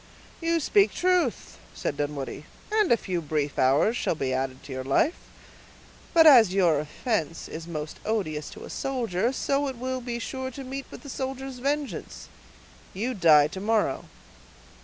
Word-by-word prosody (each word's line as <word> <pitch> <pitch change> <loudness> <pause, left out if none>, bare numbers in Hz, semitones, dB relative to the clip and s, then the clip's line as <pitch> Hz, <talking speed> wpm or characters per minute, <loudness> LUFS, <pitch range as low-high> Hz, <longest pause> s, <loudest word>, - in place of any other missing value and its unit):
"You 335 0 +1
speak 400 +6 +3
truth," 360 -8 0 0.2
said - - -3
Dunwoodie; 145 0 -4 0.3
"and 430 -3 +2
a 235 - +6
few 180 -5 -3
brief 150 -2 -2
hours 140 - +3
shall 205 - 0
be 135 -4 -2
added 130 0 -3
to - - -10
your 130 0 -4
life. 140 - +2 1.0
But 325 -1 +6
as 235 - +8
your 170 -6 +4
offense 165 - -3
is 165 +1 -7
most 155 -2 -6
odious 155 -9 -2
to - - -10
a - - -9
soldier, 235 -5 -1
so 275 +1 0
it 265 -3 -5
will 255 +1 -3
be 240 -1 -4
sure 260 +2 -4
to 270 +2 -8
meet 270 +1 -6
with - - -11
the 280 - -9
soldier's 265 0 -5
vengeance. 285 +2 -3 0.7
You 235 +7 -2
die 155 -7 +6
to 190 - -7
morrow." 220 +1 0
225 Hz, 165 wpm, -26 LUFS, -, 1.0 s, as